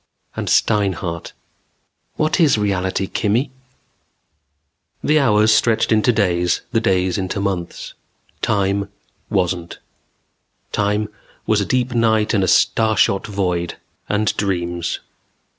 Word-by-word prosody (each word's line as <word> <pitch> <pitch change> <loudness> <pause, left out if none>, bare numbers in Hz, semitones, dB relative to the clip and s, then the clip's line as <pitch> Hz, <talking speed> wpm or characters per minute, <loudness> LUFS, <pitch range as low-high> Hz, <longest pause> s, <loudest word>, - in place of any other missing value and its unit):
And - - -4
Steinhart: 95 -6 0 0.8
"What 155 +3 0
is 155 -8 +4
reality, 95 -2 -1
Kimmy?" 115 +9 0 1.5
The 155 +1 +3
hours 110 -5 +4
stretched 110 +1 +2
into 110 +2 +4
days, 90 -5 +1
the 115 - +2
days 95 -3 +1
into 95 +1 -3
months. 95 -4 -4 0.5
Time 100 -1 0 0.4
wasn't. 90 -2 -1 0.9
Time 105 +1 0 0.4
was 110 -1 +2
a - - -1
deep 125 +2 0
night 110 -2 +2
and 100 -3 +2
a - - +1
starshot 110 0 +2
void. 90 -4 -2 0.3
And 105 0 +1
dreams. 85 -3 -2
100 Hz, 110 wpm, -19 LUFS, 95-110 Hz, 1.5 s, is